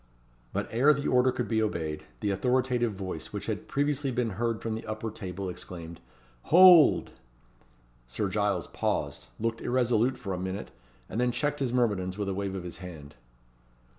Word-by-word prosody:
But - - -2
ere 140 +6 +5
the 140 - -3
order 125 0 +4
could 125 -3 -3
be 110 0 +1
obeyed, 80 -7 -2 0.2
the 105 -2 0
authoritative 125 +2 +1
voice 95 -1 -5
which - - -5
had - - -4
previously 145 0 0
been 120 -2 -1
heard 115 +3 -1
from 115 - -3
the 110 - -5
upper 110 +1 -4
table 95 -1 -6
exclaimed 85 -2 -8 0.5
"Hold!" 175 -2 +7 1.0
Sir 65 - -2
Giles 100 -2 0
paused; - - -2
looked 115 0 -2
irresolute 125 0 +1
for 95 - -4
a 90 - -3
minute; 95 +2 -4 0.4
and 115 - -2
then 125 0 +2
checked 145 +3 -1
his 130 -3 0
myrmidons 100 -7 0
with 100 -2 -2
a - - -1
wave 95 0 -3
of 95 - -5
the 90 +1 -7
hand. 80 -5 -9
110 Hz, 170 wpm, -28 LUFS, 95-125 Hz, 1.0 s, Hold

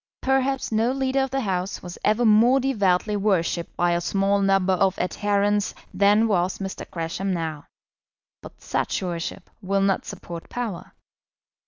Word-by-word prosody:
Perhaps 265 0 +1
no 225 +3 +2
leader 270 0 0
of 265 - -1
the 270 +1 -1
House 190 -3 -2
was 180 0 -8
ever 215 +3 +2
more 230 +5 +5
devoutly 210 -6 +1
worshipped 180 -4 0
by 175 0 +2
a 170 0 +1
small 195 +2 +1
number 195 -1 +3
of 190 +1 +2
adherents 205 +2 0 0.2
than 205 +4 +4
was 185 -3 +1
Mr. 195 -1 -6
Gresham 170 +3 -3
now; 160 -4 -4 0.7
but - - -13
such - - -2
worship 175 +1 -4
will 195 0 0
not 195 -1 +1
support 170 -1 -8
power. 230 -8 -5
195 Hz, 150 wpm, -24 LUFS, 180-220 Hz, 0.7 s, more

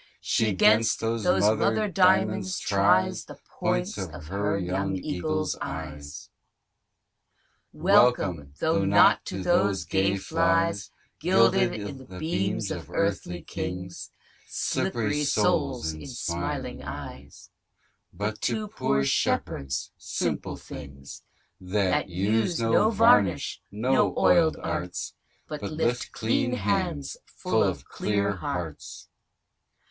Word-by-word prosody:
She 110 -3 +1
'gainst 110 +4 +4
those 115 -1 -2
mother 110 - +3
diamonds 190 0 +2
tries 100 -2 +2
The - - -11 0.2
points - - -1
of - - -6
her 100 +1 -1
young 95 +1 -2
eagle's 90 -1 -2
eyes. 75 -2 -7 1.4
Welcome, 90 - +3
(though - - +1
not - - +5
to 95 0 -5
those 100 +1 +2
gay 100 0 +1
flies 165 -3 +1 0.3
Guilded - - +3
i'th' 105 -1 -7
beams 100 - -1
of - - -6
earthly 90 -4 -2
kings 90 -1 -6 0.4
Slippery 120 +6 -1
souls 80 - +1
in 80 - -9
smiling 85 -9 -4
eyes) 70 +3 -9 0.6
But 105 +1 -4
to 215 -1 -1
poor 70 - 0
Shepherds, 70 -1 -1
simple - - -3
things, 70 -1 -10 0.4
That 95 0 0
use 110 - 0
no 115 - +3
varnish, 210 - +3
no 125 +6 +1
oil'd 160 -2 +4
arts, 85 +1 -3 0.3
But 150 -1 -6
lift 125 -6 -2
clean 120 +2 0
hands 100 - -1
full - - -1
of - - -2
clear 100 -1 -1
hearts. 85 -2 -6
100 Hz, 105 wpm, -26 LUFS, 90-120 Hz, 1.4 s, not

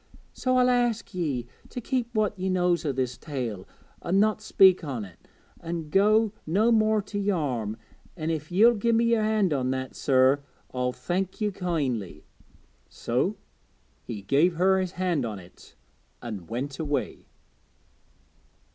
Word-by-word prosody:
So 255 0 0
I'll 250 0 +4
ask 240 -3 0
ye 145 -9 -2 0.2
to - - -5
keep 245 0 -1
what 215 -2 +2
ye 190 0 -2
knows 180 -2 +1
o' 145 - +1
this 130 -2 -3
tale 120 - -5 0.3
an' 185 +3 +1
not 215 +1 +2
speak 190 -4 +5
on't, 130 -8 -4 0.6
an' 165 -2 -5
go 215 +3 +4
no 210 +8 +3
more 215 -2 +3
to 205 0 -5
Yarm; 140 - -1 0.4
an' 160 0 -2
if 155 0 -4
ye'll 220 +7 +6
give 230 +1 +1
me 230 +1 +3
yer 230 -2 +3
hand 215 -5 +2
on 130 -2 0
that, 130 0 -3
sir, 135 +1 +3 0.3
I'll 125 0 0
thank 185 +7 -3
ye 210 -1 0
kindly.' 135 - -3 0.7
So - - -1 0.6
he 105 -4 -7
gave 155 - +3
her 190 +3 +3
his 185 -1 -3
hand 180 -6 0
on 110 -3 -4
it, 90 -1 -16 0.4
and 100 -5 -7
went 130 +4 -4
away. 145 -3 -3
175 Hz, 150 wpm, -26 LUFS, 130-210 Hz, 0.7 s, ye'll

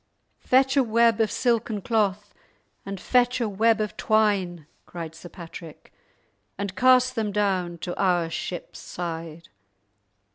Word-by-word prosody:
"Fetch 265 +2 +3
a 275 - +5
web 230 -1 +3
of 220 - +2
silken 230 -3 0
cloth, 205 -1 -1 0.5
and 195 -1 -5
fetch 250 +4 +2
a 235 - 0
web 220 +2 +2
of 210 -1 -3
twine," 200 -7 +1 0.2
cried 165 -2 -7
Sir 160 +2 -11
Patrick, 165 -2 -11 0.6
"and 200 -1 -4
cast 255 +3 +4
them 215 -2 -2
down 190 -4 0
to 175 +1 -5
our 175 -3 +2
ship's 175 +1 -6
side!" 165 -1 -7
200 Hz, 135 wpm, -25 LUFS, 175-230 Hz, 0.6 s, a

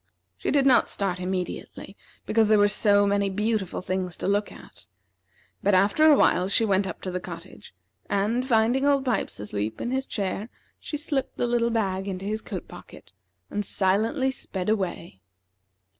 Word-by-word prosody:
She - - -4
did 280 -2 +3
not 260 -3 +5
start 190 -3 -1
immediately, 185 0 -5 0.3
because 220 -1 +3
there 215 0 +5
were 205 0 +5
so 205 -1 +3
many 200 0 +1
beautiful 210 -2 -2
things 185 -1 -3
to - - -3
look 205 +1 0
at; - - -14 0.7
but 200 -1 +3
after 200 +11 +4
a 305 - +8
while 180 - +3
she 225 +3 +3
went 195 -1 +1
up 180 - -7
to 185 - -3
the 180 - -2
cottage, 175 0 -10 0.3
and, 215 +5 +1
finding 240 +1 +2
Old 280 -1 +2
Pipes 235 - -1
asleep 105 +1 -4
in 240 - -3
his 265 +1 -1
chair, 200 +2 -3 0.3
she 300 - -5
slipped 290 -2 -3
the - - 0
little 235 -1 +1
bag 195 -4 -1
into 190 0 -4
his 215 +2 -2
coat - - -7
pocket, - - -13 0.4
and 205 - -2
silently 220 +9 +1
sped 190 -7 -5
away. 180 - -2
205 Hz, 175 wpm, -25 LUFS, 190-230 Hz, 0.7 s, a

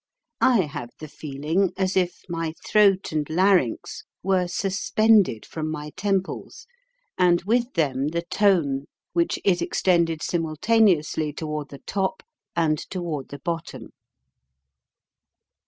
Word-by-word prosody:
I 245 -6 +5
have 145 -7 -5
the 155 - -8
feeling 155 +6 -1
as 190 0 0
if 180 -2 0
my 165 -2 -3
throat 200 -3 +4
and 155 -2 -2
larynx 180 - +1 0.2
were 185 -1 +2
suspended 195 - +2
from 155 -1 -4
my 150 -1 -5
temples 190 +1 -3 0.5
and 175 -1 +4
with 235 +5 +1
them 140 -4 +1
the 170 +2 -2
tone 170 -8 +2 0.3
which 170 -1 +1
is 180 -3 +3
extended 170 -4 +1
simultaneously 165 -2 +2
toward 150 -1 -4
the 140 - -12
top 190 -1 -2 0.3
and 155 -3 +2
toward 170 -7 -5
the 145 - -7
bottom. 165 +3 -5
170 Hz, 120 wpm, -24 LUFS, 155-190 Hz, 0.5 s, I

